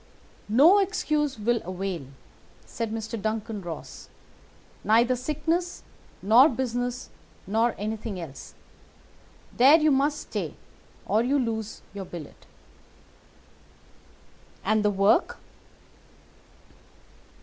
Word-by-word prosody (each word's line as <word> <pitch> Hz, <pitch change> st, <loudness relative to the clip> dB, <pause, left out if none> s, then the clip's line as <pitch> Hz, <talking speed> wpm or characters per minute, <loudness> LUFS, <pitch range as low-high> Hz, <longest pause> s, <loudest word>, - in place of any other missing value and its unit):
"'No 305 Hz, -, +6 dB
excuse 305 Hz, -, 0 dB
will 230 Hz, +2 st, 0 dB
avail,' 185 Hz, -5 st, -4 dB, 0.6 s
said 230 Hz, -2 st, -4 dB
Mr. 225 Hz, 0 st, -4 dB
Duncan 220 Hz, -1 st, -3 dB
Ross; 170 Hz, -3 st, -8 dB, 0.7 s
'neither 235 Hz, +4 st, +4 dB
sickness 310 Hz, +7 st, -2 dB, 0.4 s
nor 235 Hz, +9 st, +7 dB
business 245 Hz, 0 st, -3 dB, 0.3 s
nor 225 Hz, +4 st, +1 dB
anything 215 Hz, -1 st, -4 dB
else. 155 Hz, -5 st, -9 dB, 1.0 s
There 270 Hz, +6 st, +7 dB
you 310 Hz, -1 st, +3 dB
must 285 Hz, +2 st, +1 dB
stay, -, -, -5 dB, 0.5 s
or 215 Hz, -, +2 dB
you 265 Hz, +4 st, +1 dB
lose 225 Hz, -4 st, -3 dB
your 200 Hz, -1 st, -6 dB
billet.' 170 Hz, -5 st, -10 dB, 2.2 s
"'And 215 Hz, +1 st, +2 dB
the 210 Hz, -, +3 dB
work? 200 Hz, -, +2 dB
230 Hz, 95 wpm, -26 LUFS, 210-270 Hz, 2.2 s, nor